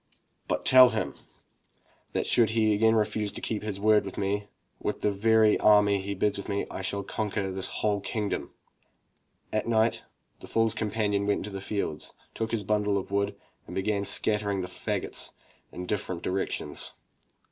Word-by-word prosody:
But -, -, -1 dB
tell 130 Hz, -1 st, +9 dB
him -, -, -2 dB, 1.0 s
that -, -, 0 dB
should 115 Hz, -2 st, +4 dB
he 110 Hz, -1 st, +4 dB
again 110 Hz, +2 st, +4 dB
refuse 105 Hz, -1 st, 0 dB
to -, -, -5 dB
keep 110 Hz, -2 st, -3 dB
his 105 Hz, -2 st, -4 dB
word 105 Hz, +1 st, +4 dB
with -, -, -7 dB
me, 100 Hz, +1 st, -1 dB, 0.3 s
with -, -, -3 dB
the 105 Hz, -, +2 dB
very 110 Hz, +1 st, +4 dB
army 105 Hz, -2 st, +5 dB
he 100 Hz, +1 st, -4 dB
bids 100 Hz, +1 st, 0 dB
me 100 Hz, 0 st, 0 dB
raise, -, -, -5 dB
I -, -, -5 dB
shall 100 Hz, +1 st, -2 dB
conquer 100 Hz, -1 st, -2 dB
his 95 Hz, 0 st, -2 dB
whole 105 Hz, -1 st, 0 dB
kingdom." 105 Hz, 0 st, -3 dB, 1.0 s
At 110 Hz, -, 0 dB
night 115 Hz, 0 st, +2 dB, 0.4 s
the -, -, -11 dB
foors 115 Hz, -1 st, +2 dB
companion 105 Hz, -2 st, 0 dB
went 100 Hz, -, +1 dB
out -, -, -5 dB
into -, -, -5 dB
the 95 Hz, 0 st, -5 dB
fields, 100 Hz, -7 st, -3 dB, 0.2 s
took 115 Hz, 0 st, -2 dB
his 110 Hz, -3 st, -1 dB
bundle 105 Hz, 0 st, +1 dB
of 95 Hz, -, -5 dB
wood, 100 Hz, 0 st, 0 dB, 0.3 s
and -, -, -8 dB
began 100 Hz, +1 st, 0 dB
scattering 100 Hz, -1 st, 0 dB
the 90 Hz, -, -4 dB
fagots 90 Hz, -, -3 dB, 0.4 s
in 90 Hz, -, -6 dB
different 90 Hz, -3 st, -3 dB
directions. 95 Hz, +1 st, -3 dB
105 Hz, 175 wpm, -28 LUFS, 100-110 Hz, 1.0 s, tell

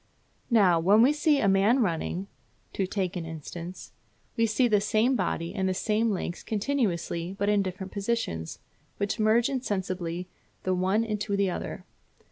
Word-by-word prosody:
Now, 195 Hz, -8 st, +5 dB
when 200 Hz, +7 st, +5 dB
we 275 Hz, +4 st, +5 dB
see 300 Hz, -1 st, +2 dB
a 205 Hz, -, +2 dB
man 195 Hz, +6 st, +4 dB
running 180 Hz, -2 st, -1 dB, 0.5 s
(to 190 Hz, -, -1 dB
take 190 Hz, -2 st, -2 dB
an 175 Hz, -, -3 dB
instance) 165 Hz, +3 st, -8 dB, 0.4 s
we 230 Hz, -1 st, +2 dB
see 220 Hz, +3 st, +2 dB
the 210 Hz, -3 st, +3 dB
same 220 Hz, +5 st, +2 dB
body 175 Hz, -5 st, -2 dB
and 190 Hz, -1 st, 0 dB
the 185 Hz, -, -1 dB
same 220 Hz, +3 st, +1 dB
legs 180 Hz, -3 st, -3 dB
continuously, 195 Hz, -, -1 dB
but 200 Hz, +1 st, 0 dB
in 205 Hz, -1 st, +3 dB
different 190 Hz, 0 st, -5 dB
positions, 200 Hz, -, -2 dB, 0.4 s
which 200 Hz, +1 st, -2 dB
merge 220 Hz, +2 st, +4 dB
insensibly 185 Hz, -9 st, -3 dB, 0.4 s
the 185 Hz, -, +1 dB
one 190 Hz, +4 st, +1 dB
into 210 Hz, -2 st, -2 dB
the 195 Hz, -2 st, +2 dB
other. -, -, -5 dB
200 Hz, 160 wpm, -27 LUFS, 180-225 Hz, 0.5 s, Now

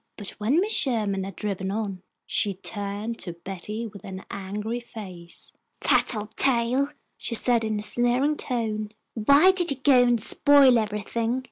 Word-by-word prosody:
But 205 Hz, -3 st, -5 dB
when 240 Hz, +10 st, +2 dB
Mrs. 410 Hz, +4 st, 0 dB
Sherman 215 Hz, -, +1 dB
had 195 Hz, -, -8 dB
driven 195 Hz, -2 st, -3 dB
on, 200 Hz, -3 st, -3 dB, 0.2 s
she 200 Hz, -2 st, +1 dB
turned 205 Hz, +3 st, -4 dB
to 175 Hz, -, -4 dB
Betty 195 Hz, +6 st, -6 dB
with 200 Hz, -4 st, -10 dB
an 190 Hz, -1 st, -8 dB
angry 210 Hz, +4 st, -4 dB
face. 185 Hz, -8 st, -10 dB, 0.3 s
"Tattletale," 240 Hz, +4 st, +1 dB, 0.3 s
she 230 Hz, -, 0 dB
said, 235 Hz, 0 st, +2 dB
in 220 Hz, -1 st, -1 dB
a 210 Hz, -, -3 dB
sneering 245 Hz, +6 st, +1 dB
tone. 220 Hz, -6 st, -3 dB, 0.2 s
"Why 280 Hz, -, +5 dB
did 360 Hz, -2 st, +3 dB
you 275 Hz, -, +1 dB
go 260 Hz, -1 st, +5 dB
and 240 Hz, -1 st, +3 dB
spoil 270 Hz, +2 st, +5 dB
everything? 225 Hz, +3 st, -2 dB
220 Hz, 150 wpm, -25 LUFS, 200-245 Hz, 0.3 s, Why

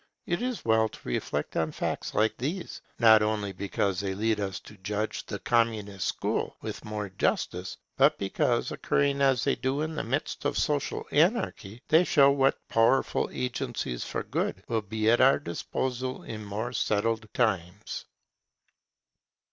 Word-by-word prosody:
It 175 Hz, +3 st, -1 dB
is 250 Hz, -2 st, -3 dB
well 110 Hz, -1 st, +3 dB
to -, -, -13 dB
reflect 60 Hz, -, -2 dB
on 80 Hz, -1 st, 0 dB
facts -, -, -3 dB
like 110 Hz, +1 st, +2 dB
these, 165 Hz, +9 st, -4 dB, 0.2 s
not 110 Hz, -2 st, +7 dB
only 105 Hz, -2 st, 0 dB
because 95 Hz, 0 st, -1 dB
they 95 Hz, -1 st, -2 dB
lead 110 Hz, +1 st, +1 dB
us 95 Hz, -3 st, -3 dB
to 105 Hz, -, -13 dB
judge 105 Hz, +3 st, -3 dB
the 100 Hz, -, -4 dB
Communist 105 Hz, -3 st, 0 dB
school -, -, -2 dB
with -, -, -6 dB
more 105 Hz, -1 st, -4 dB
justice, 90 Hz, 0 st, -1 dB, 0.2 s
but -, -, +5 dB
because, 95 Hz, -, 0 dB
occurring 140 Hz, 0 st, +1 dB
as 135 Hz, -3 st, +3 dB
they 140 Hz, -, +2 dB
do 135 Hz, +3 st, -1 dB
in 160 Hz, +1 st, -2 dB
the 155 Hz, -, -3 dB
midst 135 Hz, +6 st, -2 dB
of -, -, 0 dB
social 145 Hz, -2 st, 0 dB
anarchy, 145 Hz, -, +1 dB
they 160 Hz, +3 st, +6 dB
show 140 Hz, -5 st, +5 dB
what 135 Hz, -1 st, +1 dB
powerful 115 Hz, +4 st, +2 dB
agencies 120 Hz, -, -3 dB
for -, -, -3 dB
good 95 Hz, -, -2 dB
will 115 Hz, -2 st, 0 dB
be 110 Hz, +2 st, -2 dB
at 120 Hz, +2 st, +5 dB
our 130 Hz, +1 st, +6 dB
disposal 130 Hz, +8 st, -3 dB
in 110 Hz, -1 st, -6 dB
more 105 Hz, +4 st, -4 dB
settled 110 Hz, 0 st, 0 dB
times. 100 Hz, -4 st, -1 dB
110 Hz, 155 wpm, -28 LUFS, 100-135 Hz, 0.2 s, not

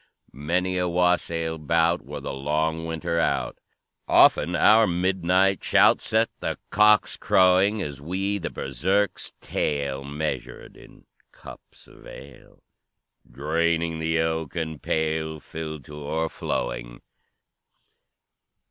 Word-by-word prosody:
"Many 90 Hz, +6 st, -1 dB
a 90 Hz, -, 0 dB
wassail 85 Hz, -2 st, 0 dB
bout 85 Hz, +3 st, +1 dB
Wore -, -, -8 dB
the -, -, -5 dB
long 80 Hz, +4 st, -1 dB
winter 85 Hz, +1 st, -2 dB
out; -, -, -1 dB, 0.5 s
Often 85 Hz, +4 st, +4 dB
our 110 Hz, +1 st, +5 dB
midnight 95 Hz, +1 st, +1 dB
shout -, -, +4 dB
Set 110 Hz, +1 st, +1 dB
the -, -, -3 dB
cocks 105 Hz, 0 st, +4 dB
crowing, 95 Hz, +3 st, +3 dB
As 70 Hz, -2 st, -7 dB
we 95 Hz, +6 st, -2 dB
the 85 Hz, -, -4 dB
Berserk's 95 Hz, +9 st, -1 dB
tale 70 Hz, -2 st, -2 dB
Measured 75 Hz, +2 st, -5 dB
in -, -, -17 dB, 0.3 s
cups -, -, -15 dB
of -, -, -16 dB
ale, 70 Hz, -2 st, -14 dB, 0.7 s
Draining 80 Hz, +5 st, -1 dB
the 80 Hz, +1 st, 0 dB
oaken 80 Hz, -1 st, -3 dB
pail, 80 Hz, 0 st, -2 dB
Filled 80 Hz, -2 st, -7 dB
to 75 Hz, -, -12 dB
o'erflowing. 60 Hz, -6 st, -4 dB
80 Hz, 110 wpm, -24 LUFS, 75-90 Hz, 0.7 s, our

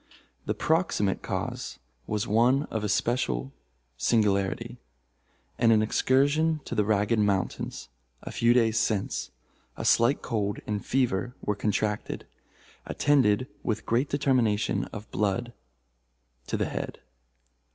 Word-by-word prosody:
The -, -, 0 dB
proximate 160 Hz, -, +1 dB
cause -, -, -4 dB, 0.3 s
was 105 Hz, -1 st, -1 dB
one 120 Hz, +6 st, +3 dB
of 110 Hz, -1 st, -2 dB
especial 100 Hz, -, 0 dB, 0.4 s
singularity. 105 Hz, -, +1 dB, 0.8 s
In 115 Hz, -, +4 dB
an 110 Hz, -1 st, +5 dB
excursion 145 Hz, +7 st, +2 dB
to -, -, -5 dB
the 105 Hz, -, +2 dB
Ragged 105 Hz, +2 st, +1 dB
Mountains, 100 Hz, -3 st, -1 dB, 0.4 s
a -, -, -6 dB
few 115 Hz, 0 st, +3 dB
days 115 Hz, -2 st, +3 dB
since, 105 Hz, -4 st, -1 dB, 0.5 s
a -, -, -4 dB
slight 120 Hz, +5 st, +3 dB
cold 105 Hz, -4 st, -1 dB
and 105 Hz, -1 st, -3 dB
fever 125 Hz, -2 st, 0 dB
were 105 Hz, -, 0 dB
contracted, 105 Hz, +1 st, -2 dB, 0.6 s
attended 130 Hz, -5 st, +3 dB, 0.2 s
with 110 Hz, -2 st, -2 dB
great 125 Hz, +5 st, +1 dB
determination 125 Hz, -7 st, +1 dB
of 105 Hz, -1 st, -9 dB
blood 115 Hz, +4 st, -1 dB, 0.9 s
to -, -, -1 dB
the -, -, 0 dB
head. -, -, -5 dB
110 Hz, 120 wpm, -27 LUFS, 105-125 Hz, 0.9 s, an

